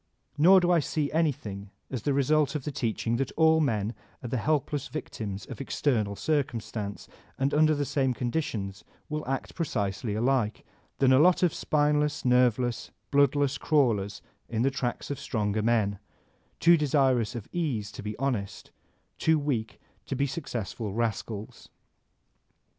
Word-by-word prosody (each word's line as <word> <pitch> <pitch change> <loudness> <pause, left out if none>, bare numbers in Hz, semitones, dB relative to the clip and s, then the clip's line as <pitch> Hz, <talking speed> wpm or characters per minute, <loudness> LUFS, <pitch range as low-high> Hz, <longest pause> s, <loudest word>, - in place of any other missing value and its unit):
Nor 180 +6 +7
do 175 0 +2
I 175 - +5
see 150 0 -1
any 160 -1 +3
thing 100 -7 -8 0.2
as 130 -4 -3
the 145 - 0
result 150 +2 +2
of 145 - -2
the 150 - -3
teaching 115 -3 -1
that 135 0 -1
all 160 0 +5
men 110 -7 0 0.3
are 120 - -4
the 130 - -1
helpless 145 +2 0
victims 105 -9 -5
of - - -8
external 115 -7 0
circumstance 115 -8 -2 0.3
and 135 +2 0
under 155 +1 +4
Uie 145 0 -1
same 130 -2 0
conditions 110 -7 -3 0.3
will 150 0 -3
act 135 -1 -3
precisely 105 - -2
alike, 120 -1 0 0.3
than 130 -1 +4
a 130 - +6
lot 180 +3 +5
of 175 - +3
spineless, 150 -1 +1
nerveless, 125 -1 +2 0.2
bloodless 145 0 +3
crawlers 110 -10 +1 0.3
in 115 0 0
the 135 - +2
tracks 130 0 -3
of 140 - -4
stronger 105 -2 -1
men, 105 -3 +1 0.3
— - - -39
too 170 0 +6
desirous 135 -5 +2
of 115 - -6
ease 135 - -2
to - - -8
be 105 +1 -5
honest, 120 -7 -3 0.5
too 160 0 +3
weak 135 -7 -2 0.3
to 135 - -2
be 140 +2 +1
successful 120 - -4
rascals. 110 -1 -3
130 Hz, 155 wpm, -28 LUFS, 110-150 Hz, 0.5 s, Nor